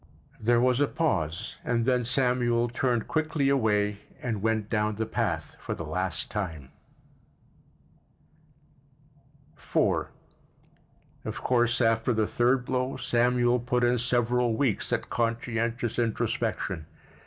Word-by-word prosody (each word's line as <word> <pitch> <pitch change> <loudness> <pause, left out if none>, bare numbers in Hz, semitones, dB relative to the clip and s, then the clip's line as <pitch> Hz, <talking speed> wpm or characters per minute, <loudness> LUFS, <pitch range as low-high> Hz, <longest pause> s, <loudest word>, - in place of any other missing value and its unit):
There 120 +2 +3
was 125 +2 +3
a 145 - +4
pause 85 - -1
and 115 -2 0
then 125 -1 +2
Samuel 125 -1 +2
turned 120 -1 0
quickly 155 -3 0
away 105 -6 +1 0.2
and 110 -5 -3
went 110 -1 0
down 105 -1 0
the 110 +2 -2
path - - -2
for - - -4
the 80 - -6
last 90 +2 -1
time. 80 -10 -4 2.9
IV - - 0 1.2
Of - - -6
course, 120 -1 +2
after 115 0 +2
the 110 -1 +1
third 125 +3 +1
blow 130 +1 -1
Samuel 120 0 +2
put 120 +1 0
in 120 0 +3
several 120 -1 +1
weeks 125 -5 0
at - - -2
conscientious 115 0 -1
introspection. 95 -7 -1
120 Hz, 120 wpm, -27 LUFS, 110-125 Hz, 2.9 s, a